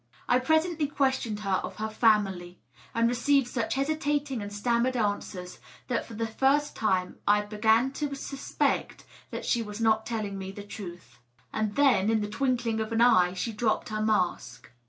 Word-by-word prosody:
I 245 Hz, -, +4 dB
presently 315 Hz, +3 st, +1 dB
questioned 265 Hz, -7 st, 0 dB
her 195 Hz, -2 st, +1 dB
of -, -, -6 dB
her 215 Hz, +1 st, -3 dB
family, 200 Hz, -5 st, +1 dB, 0.4 s
and 230 Hz, 0 st, +3 dB
received 245 Hz, +2 st, +2 dB
such 235 Hz, -1 st, -2 dB
hesitating 290 Hz, -2 st, -1 dB
ana 205 Hz, -, -5 dB
stammered 235 Hz, +4 st, 0 dB
answers 205 Hz, -4 st, -3 dB, 0.3 s
that 240 Hz, -, -1 dB
for 230 Hz, -, -9 dB
the 230 Hz, +1 st, -1 dB
first 270 Hz, +6 st, +1 dB
time 185 Hz, -4 st, 0 dB
I 210 Hz, 0 st, +4 dB
b^an 220 Hz, +5 st, +2 dB
to 285 Hz, -1 st, -3 dB
suspect 275 Hz, 0 st, -2 dB, 0.4 s
she 240 Hz, -, +1 dB
was 210 Hz, -1 st, -6 dB
not 220 Hz, -1 st, +2 dB
telling 210 Hz, -4 st, -3 dB
me 190 Hz, 0 st, -5 dB
the 205 Hz, -, -8 dB
truth. 175 Hz, -, -10 dB, 0.3 s
And 215 Hz, -1 st, -1 dB
then, 245 Hz, -9 st, +4 dB
in 225 Hz, -1 st, +2 dB
the 210 Hz, -, -2 dB
twink 250 Hz, +1 st, 0 dB
ling 225 Hz, -1 st, 0 dB
of 220 Hz, +1 st, -3 dB
an 225 Hz, -, 0 dB
eye, 185 Hz, -7 st, +5 dB
she 225 Hz, +5 st, -3 dB
dropped 215 Hz, 0 st, 0 dB
her 215 Hz, 0 st, -2 dB
mask. 185 Hz, -, -1 dB
220 Hz, 175 wpm, -28 LUFS, 205-255 Hz, 0.4 s, eye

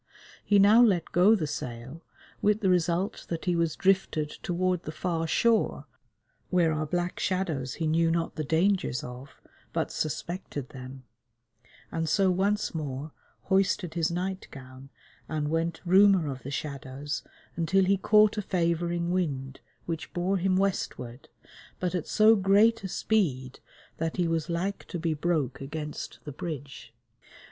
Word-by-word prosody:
He 205 Hz, -, +3 dB
now 205 Hz, +4 st, +7 dB
let 190 Hz, -8 st, +3 dB
go 190 Hz, +6 st, +5 dB
the 170 Hz, -7 st, -1 dB
sail, 130 Hz, +1 st, -6 dB, 0.4 s
with 210 Hz, +1 st, +2 dB
the 190 Hz, -, +2 dB
result 175 Hz, +2 st, 0 dB
that 165 Hz, -1 st, -4 dB
he 180 Hz, -1 st, +1 dB
was 165 Hz, -2 st, 0 dB
drifted 185 Hz, -6 st, +1 dB
toward 180 Hz, 0 st, 0 dB
the 155 Hz, -, -6 dB
far 165 Hz, +1 st, -2 dB
shore, 230 Hz, +7 st, +2 dB, 0.6 s
where 170 Hz, -3 st, +3 dB
are 155 Hz, 0 st, -2 dB
black 175 Hz, +2 st, -2 dB
shadows 160 Hz, -9 st, -1 dB
he 165 Hz, -, -2 dB
knew 165 Hz, +1 st, +2 dB
not 165 Hz, 0 st, -1 dB
the 155 Hz, -, -3 dB
dangers 165 Hz, -3 st, +1 dB
of, 125 Hz, +2 st, -10 dB, 0.3 s
but -, -, -1 dB
suspected 155 Hz, -3 st, -4 dB
them, 130 Hz, 0 st, -10 dB, 0.9 s
and 165 Hz, -1 st, -2 dB
so 190 Hz, +4 st, +3 dB
once 200 Hz, +3 st, 0 dB
more 150 Hz, -1 st, -4 dB, 0.3 s
hoisted 190 Hz, -3 st, +1 dB
his 165 Hz, -2 st, +1 dB
night 185 Hz, +2 st, -3 dB
gown 130 Hz, 0 st, -12 dB, 0.4 s
and 150 Hz, -2 st, -1 dB
went 165 Hz, +1 st, -1 dB
roomer 190 Hz, -4 st, +5 dB
of 130 Hz, -1 st, -7 dB
the 130 Hz, -, -7 dB
shadows 140 Hz, 0 st, -4 dB, 0.3 s
until 185 Hz, +4 st, +2 dB
he 195 Hz, +2 st, +4 dB
caught 210 Hz, +2 st, +4 dB
a -, -, 0 dB
favouring 170 Hz, -1 st, 0 dB
wind, 135 Hz, -7 st, -2 dB, 0.3 s
which 165 Hz, -2 st, -4 dB
bore 185 Hz, +3 st, +1 dB
him 185 Hz, +1 st, +1 dB
westward, 140 Hz, -10 st, -2 dB, 0.5 s
but 180 Hz, -1 st, -1 dB
at 180 Hz, -4 st, -2 dB
so 220 Hz, +1 st, +5 dB
great 210 Hz, +3 st, +4 dB
a -, -, -2 dB
speed 145 Hz, -, -1 dB, 0.4 s
that 165 Hz, 0 st, -2 dB
he 175 Hz, -2 st, +2 dB
was 165 Hz, -1 st, -1 dB
like 180 Hz, +4 st, -2 dB
to 180 Hz, -, -4 dB
be 165 Hz, -1 st, -1 dB
broke 150 Hz, -5 st, -1 dB
against 150 Hz, +2 st, -6 dB
the 150 Hz, -, -7 dB
bridge. 140 Hz, -2 st, -7 dB
170 Hz, 155 wpm, -28 LUFS, 150-190 Hz, 0.9 s, now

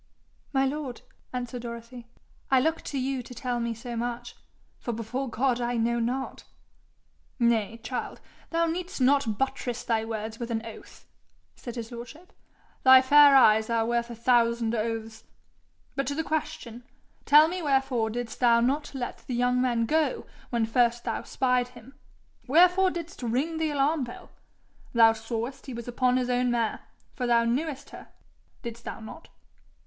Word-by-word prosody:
'My 270 Hz, -1 st, +2 dB
lord,' 270 Hz, -2 st, -4 dB, 0.3 s
answered 245 Hz, -1 st, -4 dB
Dorothy, 235 Hz, 0 st, -8 dB, 0.4 s
'I 265 Hz, -, +5 dB
look 320 Hz, +3 st, 0 dB
to 280 Hz, -, -4 dB
you 265 Hz, 0 st, -1 dB
to 250 Hz, +1 st, -11 dB
tell 245 Hz, +1 st, -2 dB
me 235 Hz, -1 st, -2 dB
so 235 Hz, +1 st, -7 dB
much, 240 Hz, +1 st, -4 dB, 0.4 s
for 240 Hz, -, -4 dB
before 240 Hz, +4 st, -4 dB
God 245 Hz, +1 st, 0 dB
I 240 Hz, 0 st, -1 dB
know 235 Hz, +1 st, +1 dB
not.' 250 Hz, +3 st, -3 dB, 0.9 s
'Nay, 230 Hz, -2 st, +1 dB
child! 250 Hz, -, -4 dB, 0.3 s
thou 335 Hz, 0 st, +1 dB
need'st 345 Hz, +1 st, -4 dB
not 260 Hz, -5 st, +2 dB
buttress 250 Hz, -2 st, -2 dB
thy 225 Hz, -2 st, 0 dB
words 225 Hz, 0 st, -5 dB
with 235 Hz, -1 st, -4 dB
an 225 Hz, -1 st, -2 dB
oath,' 225 Hz, -, -12 dB, 0.5 s
said 240 Hz, -1 st, -8 dB
his 230 Hz, -1 st, -6 dB
lordship. 245 Hz, +10 st, -10 dB, 0.5 s
'Thy 260 Hz, 0 st, +8 dB
fair 285 Hz, +1 st, +7 dB
eyes 220 Hz, -4 st, +6 dB
are 230 Hz, -1 st, +1 dB
worth 235 Hz, 0 st, 0 dB
a 235 Hz, -, -7 dB
thousand 235 Hz, -1 st, +2 dB
oaths. 225 Hz, 0 st, -3 dB, 0.7 s
But 275 Hz, -, -1 dB
to 285 Hz, -, -1 dB
the 320 Hz, -, -1 dB
question: 300 Hz, -7 st, -4 dB, 0.5 s
tell 300 Hz, +2 st, +8 dB
me 360 Hz, +2 st, -4 dB
wherefore 270 Hz, -6 st, +1 dB
didst 235 Hz, 0 st, -5 dB
thou 235 Hz, -2 st, +5 dB
not 275 Hz, +5 st, 0 dB
let 245 Hz, -2 st, -4 dB
the 250 Hz, -, -2 dB
young 250 Hz, +1 st, +2 dB
man 240 Hz, -2 st, +1 dB
go 310 Hz, +5 st, 0 dB, 0.2 s
when 235 Hz, -2 st, +1 dB
first 235 Hz, +1 st, +2 dB
thou -, -, -2 dB
spied 250 Hz, -2 st, 0 dB
him? 250 Hz, +1 st, -15 dB, 0.5 s
Wherefore 360 Hz, +6 st, +5 dB
didst 345 Hz, -3 st, -7 dB
ring 260 Hz, +8 st, -1 dB
the 320 Hz, -1 st, 0 dB
alarm 290 Hz, 0 st, +1 dB
bell? 240 Hz, -, -11 dB, 0.6 s
Thou 225 Hz, -1 st, +6 dB
sawest 230 Hz, +4 st, -5 dB
he 260 Hz, -, -6 dB
was 235 Hz, 0 st, -7 dB
upon 250 Hz, +1 st, +1 dB
his 250 Hz, -1 st, 0 dB
own 250 Hz, 0 st, +1 dB
mare, 235 Hz, -2 st, 0 dB, 0.3 s
for 250 Hz, -, -3 dB
thou 235 Hz, -1 st, +4 dB
knewest 280 Hz, +3 st, -2 dB
her -, -, -11 dB, 0.6 s
didst 235 Hz, 0 st, -7 dB
thou -, -, -6 dB
not?' 220 Hz, -, -11 dB
245 Hz, 165 wpm, -27 LUFS, 235-270 Hz, 0.9 s, Thy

